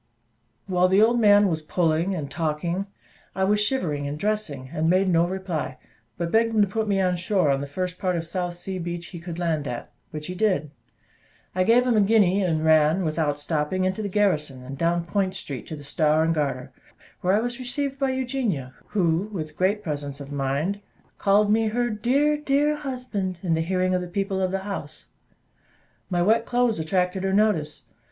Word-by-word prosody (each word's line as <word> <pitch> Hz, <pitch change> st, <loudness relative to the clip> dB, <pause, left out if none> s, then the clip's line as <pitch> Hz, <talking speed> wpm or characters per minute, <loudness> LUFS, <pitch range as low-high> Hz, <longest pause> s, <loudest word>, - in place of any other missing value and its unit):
While 180 Hz, -1 st, +2 dB
the 190 Hz, +2 st, +4 dB
old 235 Hz, +3 st, +4 dB
man 205 Hz, -2 st, +6 dB
was 160 Hz, -4 st, -1 dB
pulling 165 Hz, +3 st, 0 dB
and 145 Hz, -5 st, -5 dB
talking, 170 Hz, +4 st, -2 dB, 0.5 s
I 190 Hz, -, 0 dB
was 210 Hz, +2 st, +3 dB
shivering 155 Hz, -, -1 dB
and 145 Hz, +1 st, -4 dB
dressing, 155 Hz, -10 st, -2 dB
and 160 Hz, +1 st, +1 dB
made 185 Hz, +2 st, +3 dB
no 170 Hz, -1 st, +3 dB
reply; 180 Hz, -8 st, -4 dB, 0.4 s
but 170 Hz, -1 st, -2 dB
begged 225 Hz, 0 st, +2 dB
him 215 Hz, -, +5 dB
to -, -, +1 dB
put 220 Hz, +3 st, -2 dB
me 200 Hz, -1 st, +1 dB
on 180 Hz, -1 st, +2 dB
shore 185 Hz, -4 st, +1 dB
on 135 Hz, 0 st, 0 dB
the 140 Hz, -, -4 dB
first 180 Hz, +5 st, -4 dB
part 185 Hz, -2 st, 0 dB
of 165 Hz, -1 st, -2 dB
South 175 Hz, +1 st, -3 dB
Sea 185 Hz, +1 st, -4 dB
Beach 175 Hz, 0 st, -4 dB
he 175 Hz, -, -8 dB
could 170 Hz, 0 st, -7 dB
land 160 Hz, -4 st, -1 dB
at, 120 Hz, -, -6 dB, 0.2 s
which 150 Hz, -1 st, -6 dB
he 180 Hz, -, -5 dB
did. 185 Hz, -7 st, 0 dB, 0.8 s
I 185 Hz, -, +2 dB
gave 235 Hz, +5 st, +4 dB
him 245 Hz, -2 st, +2 dB
a 215 Hz, -, +5 dB
guinea, 200 Hz, -2 st, +4 dB
and 160 Hz, -4 st, 0 dB
ran, 160 Hz, +3 st, +4 dB
without 155 Hz, -2 st, 0 dB
stopping, 155 Hz, +4 st, -1 dB
into 185 Hz, +3 st, -1 dB
the 205 Hz, -, -3 dB
garrison, 150 Hz, -10 st, 0 dB
and 135 Hz, +2 st, -7 dB
down 170 Hz, +3 st, 0 dB
Point 190 Hz, +1 st, -1 dB
Street 140 Hz, -8 st, -6 dB
to 155 Hz, -, -5 dB
the 145 Hz, -, -10 dB
Star 155 Hz, +2 st, +2 dB
and 165 Hz, +1 st, +2 dB
Garter, 140 Hz, -4 st, -2 dB, 0.5 s
where 185 Hz, +2 st, +2 dB
I -, -, +3 dB
was 240 Hz, +2 st, -3 dB
received 275 Hz, +2 st, -3 dB
by 270 Hz, -1 st, +1 dB
Eugenia, 250 Hz, -, -2 dB
who, 180 Hz, 0 st, 0 dB
with 155 Hz, -6 st, -5 dB
great 200 Hz, +4 st, +1 dB
presence 145 Hz, -3 st, -4 dB
of 140 Hz, 0 st, -9 dB
mind, 145 Hz, +8 st, -1 dB, 0.4 s
called 205 Hz, +1 st, +3 dB
me 220 Hz, +1 st, +3 dB
her 240 Hz, +2 st, 0 dB
"dear, 275 Hz, +8 st, +2 dB
dear 295 Hz, +1 st, +1 dB
husband!" 250 Hz, -, -3 dB
in 175 Hz, -3 st, +1 dB
the 160 Hz, -, +1 dB
hearing 185 Hz, +2 st, 0 dB
of 180 Hz, -, +1 dB
the 180 Hz, -, -5 dB
people 195 Hz, +1 st, -2 dB
of 185 Hz, -, +1 dB
the 190 Hz, +1 st, -2 dB
house. 200 Hz, -1 st, -6 dB, 1.0 s
My 175 Hz, -2 st, +1 dB
wet 225 Hz, +4 st, +3 dB
clothes 240 Hz, -5 st, +1 dB
attracted 180 Hz, +3 st, 0 dB
her 190 Hz, 0 st, 0 dB
notice. 195 Hz, -8 st, +1 dB
185 Hz, 200 wpm, -24 LUFS, 160-210 Hz, 1.0 s, man